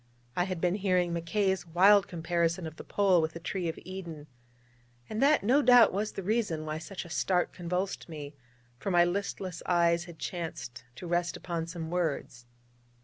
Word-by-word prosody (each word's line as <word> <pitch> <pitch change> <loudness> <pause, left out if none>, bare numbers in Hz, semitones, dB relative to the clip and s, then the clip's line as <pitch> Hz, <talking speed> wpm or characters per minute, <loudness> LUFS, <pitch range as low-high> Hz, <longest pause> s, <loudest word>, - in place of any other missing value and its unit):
I 175 - +1
had 185 -2 -4
been 175 +1 +1
hearing 185 -3 +1
Mackay's 175 +2 0
wild 195 +4 +5
comparison 170 0 -1
of 160 0 -8
the - - -8
Pole 190 -4 +3
with 160 0 -2
the 170 - -7
tree 175 0 -3
of 160 - -5
Eden, 170 -5 -7 0.8
and 215 - -3
that 290 -2 +4
no 255 +8 +4
doubt 245 -6 +7
was 210 +3 -2
the 195 - -5
reason 200 -7 0
why 155 0 -3
such 185 +2 -7
a - - -11
start 180 +1 +1
convulsed 180 +2 -3
me: 150 -2 -7 0.5
for 165 - -3
my 175 -2 +5
listless 185 -1 -3
eyes 170 -1 +3
had 170 -2 -11
chanced 160 -9 -6
to 155 - -9
rest 175 0 0
upon 170 -2 -4
some 165 -1 -6
words. 145 -8 -2
175 Hz, 180 wpm, -30 LUFS, 165-190 Hz, 0.8 s, doubt